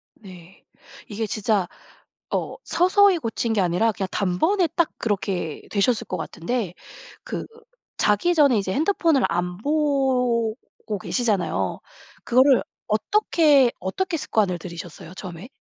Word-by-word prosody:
네. 185 Hz, -3 st, -15 dB, 0.4 s
이게 215 Hz, +1 st, -3 dB
진짜 205 Hz, -2 st, 0 dB, 0.7 s
어 -, -, -2 dB
서서히 375 Hz, +1 st, +4 dB
고친 230 Hz, -4 st, -2 dB
게 210 Hz, -, +2 dB
아니라 180 Hz, +6 st, +2 dB
그냥 195 Hz, -2 st, -4 dB
단번에 320 Hz, -, +1 dB
딱 340 Hz, -3 st, +2 dB
그렇게 190 Hz, -6 st, -2 dB
되셨을 215 Hz, +3 st, +1 dB
것 185 Hz, -, -3 dB
같은데 200 Hz, 0 st, -3 dB, 0.5 s
그 -, -, -5 dB, 0.5 s
자기 210 Hz, -, +2 dB
전에 285 Hz, -7 st, +4 dB
이제 195 Hz, -2 st, -1 dB
핸드폰을 320 Hz, -, +2 dB
안 180 Hz, 0 st, -2 dB
보고 255 Hz, -4 st, +1 dB, 0.4 s
계시잖아요. 215 Hz, -6 st, -1 dB, 0.4 s
그거를 260 Hz, +2 st, +4 dB, 0.2 s
어떻게, 285 Hz, -, +3 dB
어떻게 330 Hz, -, -2 dB
습관을 205 Hz, -, 0 dB
들이셨어요, 170 Hz, 0 st, -9 dB
처음에? 185 Hz, +1 st, -8 dB
225 Hz, 270 characters per minute, -23 LUFS, 190-285 Hz, 0.7 s, 서서히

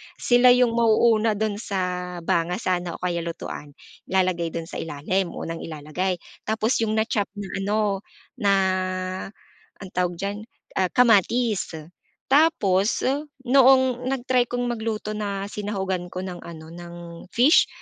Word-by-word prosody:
sila 245 Hz, 0 st, +5 dB
'yung 250 Hz, -2 st, +4 dB
mauuna 225 Hz, -1 st, +3 dB
dun 210 Hz, 0 st, -1 dB
sa 180 Hz, -3 st, -3 dB
banga 170 Hz, +2 st, +1 dB
sana 180 Hz, -5 st, -2 dB
o -, -, -12 dB
kaya 175 Hz, -1 st, 0 dB
lutuan, 165 Hz, -3 st, -6 dB, 0.3 s
ilalagay 185 Hz, -2 st, +1 dB
dun 165 Hz, 0 st, -5 dB
sa -, -, -6 dB
ilalim, 165 Hz, +4 st, -2 dB
unang 165 Hz, 0 st, -5 dB
ilalagay. 160 Hz, +4 st, -3 dB, 0.3 s
Tapos 220 Hz, +2 st, +1 dB
'yung 220 Hz, -1 st, 0 dB
na-chop 220 Hz, -1 st, 0 dB
na 205 Hz, -1 st, -6 dB
ano 210 Hz, +2 st, 0 dB, 0.6 s
na, 200 Hz, -3 st, +3 dB, 1.3 s
ang 190 Hz, -, -8 dB
tawag 180 Hz, -1 st, 0 dB
diyan, 200 Hz, +3 st, -3 dB, 0.4 s
ah, 185 Hz, -, +3 dB
kamatis. 230 Hz, -4 st, +3 dB, 0.6 s
Tapos 210 Hz, -, +3 dB, 0.4 s
noong 260 Hz, -1 st, +5 dB
nag-try 250 Hz, -2 st, +1 dB
kong 245 Hz, 0 st, -1 dB
magluto 220 Hz, -2 st, -3 dB
na 200 Hz, -2 st, -3 dB
sinahugan 195 Hz, -4 st, -3 dB
ko -, -, -9 dB
ng 180 Hz, -2 st, -7 dB
ano 160 Hz, -1 st, -10 dB
ng 175 Hz, 0 st, -9 dB, 0.3 s
fish, 265 Hz, +8 st, +5 dB
200 Hz, 130 wpm, -24 LUFS, 180-230 Hz, 1.3 s, sila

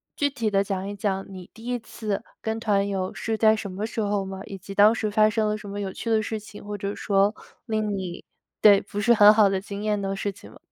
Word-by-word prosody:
具 285 Hz, -, +1 dB
体 235 Hz, -6 st, -2 dB
地 195 Hz, -1 st, +2 dB
讲 195 Hz, -1 st, -3 dB
一 205 Hz, -, -5 dB
讲 195 Hz, -1 st, -2 dB
你 185 Hz, -2 st, -10 dB
第 225 Hz, -, -14 dB
1 245 Hz, 0 st, -1 dB
次 215 Hz, -2 st, -4 dB, 0.2 s
跟 220 Hz, 0 st, -2 dB
团 205 Hz, -3 st, +1 dB
游 190 Hz, -2 st, -2 dB
是 225 Hz, -1 st, -3 dB
在 220 Hz, 0 st, +5 dB
什 205 Hz, -2 st, -5 dB
么 200 Hz, +3 st, -3 dB
时 225 Hz, +1 st, -5 dB
候 205 Hz, -1 st, 0 dB
吗？ 190 Hz, 0 st, -7 dB
以 195 Hz, -, -7 dB
及 195 Hz, +1 st, -9 dB
当 205 Hz, +2 st, +6 dB
时 215 Hz, -1 st, -1 dB
发 215 Hz, 0 st, +4 dB
生 215 Hz, 0 st, 0 dB
了 210 Hz, 0 st, 0 dB
什 210 Hz, -1 st, -10 dB
么 200 Hz, +1 st, -5 dB
有 195 Hz, -2 st, -3 dB
趣 230 Hz, -, -5 dB
的 220 Hz, -1 st, +3 dB
事 215 Hz, +1 st, -3 dB
情， 210 Hz, 0 st, -12 dB
或 205 Hz, 0 st, -5 dB
者 200 Hz, 0 st, -4 dB
说 200 Hz, +1 st, +2 dB, 0.3 s
令 215 Hz, -2 st, -1 dB
你 180 Hz, -2 st, -6 dB, 0.4 s
对， 205 Hz, -2 st, +7 dB
不 205 Hz, -, -6 dB
是 235 Hz, +3 st, +5 dB
很 210 Hz, -1 st, +8 dB
好 210 Hz, -2 st, +5 dB
的 195 Hz, -1 st, 0 dB
经 200 Hz, +1 st, -7 dB
验 210 Hz, -1 st, 0 dB
的 195 Hz, 0 st, -2 dB
事 200 Hz, +1 st, -2 dB
情 195 Hz, -, -15 dB
吗？ -, -, -16 dB
205 Hz, 280 characters per minute, -25 LUFS, 195-215 Hz, 0.4 s, 很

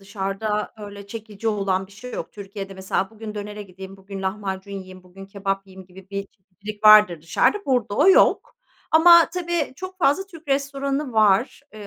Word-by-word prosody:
Dışarıda 200 Hz, +2 st, -3 dB
öyle 205 Hz, -1 st, -9 dB
çekici 220 Hz, 0 st, -6 dB
olan 195 Hz, -3 st, -1 dB
bir 195 Hz, -, -20 dB
şey 250 Hz, +5 st, -10 dB
yok. -, -, -6 dB
Türkiye'de 195 Hz, -1 st, -8 dB
mesela 190 Hz, 0 st, -2 dB
bugün 220 Hz, -1 st, -9 dB
dönere 210 Hz, 0 st, -6 dB
gideyim, 190 Hz, 0 st, -11 dB
bugün 195 Hz, 0 st, -9 dB
lahmacun 190 Hz, 0 st, -4 dB
yiyeyim, 185 Hz, -1 st, -9 dB
bugün 190 Hz, +2 st, -13 dB
kebap 195 Hz, 0 st, -3 dB
yiyeyim 190 Hz, -1 st, -13 dB
gibi 190 Hz, +1 st, -16 dB
bir 200 Hz, 0 st, -4 dB
çeşitlilik 205 Hz, +2 st, -12 dB
vardır 210 Hz, -6 st, +7 dB
dışarıda, 165 Hz, -, +2 dB
burada 245 Hz, -6 st, 0 dB
o 300 Hz, -, +4 dB
yok. 380 Hz, -, +4 dB, 0.4 s
Ama 335 Hz, +1 st, +7 dB
tabii 345 Hz, -5 st, -2 dB
çok 370 Hz, +2 st, -8 dB
fazla 360 Hz, +3 st, +2 dB
Türk 330 Hz, -5 st, -15 dB
restoranı 275 Hz, 0 st, -1 dB
var. 220 Hz, +5 st, +2 dB
Eee, 210 Hz, -1 st, -10 dB
205 Hz, 170 wpm, -23 LUFS, 195-250 Hz, 0.4 s, vardır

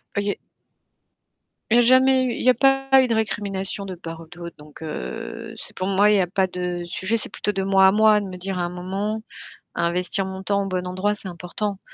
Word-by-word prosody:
Ça 200 Hz, -, +1 dB
y 205 Hz, -, -2 dB
est. -, -, -8 dB, 1.3 s
Il -, -, +6 dB
y -, -, +6 dB
a -, -, +7 dB
jamais 260 Hz, +1 st, +5 dB
eu, 250 Hz, -, 0 dB
il -, -, -5 dB
y 255 Hz, -, +5 dB
a -, -, +7 dB
pas 270 Hz, +1 st, +4 dB
eu 260 Hz, -, +1 dB
de 230 Hz, -, +1 dB
récrimination 200 Hz, -2 st, -2 dB
de 185 Hz, -2 st, -6 dB
part 165 Hz, -1 st, -8 dB
ou 165 Hz, -, -12 dB
d'autre. 170 Hz, 0 st, -10 dB
Donc 150 Hz, +1 st, -15 dB
heu, 60 Hz, -, -6 dB
c'est -, -, -8 dB
pour 185 Hz, -, -3 dB
moi, 200 Hz, +2 st, +4 dB
il 210 Hz, -, +4 dB
y -, -, +3 dB
a 180 Hz, -, +2 dB
pas 190 Hz, +1 st, +1 dB
de 180 Hz, -1 st, -4 dB
sujet, 185 Hz, +5 st, -2 dB
c'est 225 Hz, -, 0 dB
plutôt 210 Hz, -, -2 dB
de 195 Hz, 0 st, -1 dB
moi 195 Hz, 0 st, +5 dB
à 190 Hz, -, +4 dB
moi 215 Hz, 0 st, +5 dB
de 205 Hz, -, -5 dB
me 185 Hz, -, -7 dB
dire 185 Hz, 0 st, -4 dB
à -, -, 0 dB
un -, -, 0 dB
moment, 195 Hz, +5 st, -3 dB, 0.5 s
investir 180 Hz, +3 st, 0 dB
mon 190 Hz, 0 st, -6 dB
temps 200 Hz, +1 st, +1 dB
au -, -, -3 dB
bon 180 Hz, -1 st, -2 dB
endroit, 190 Hz, +3 st, -1 dB
c'est 205 Hz, -, -12 dB
important 185 Hz, +3 st, -4 dB
195 Hz, 250 wpm, -23 LUFS, 180-210 Hz, 1.3 s, a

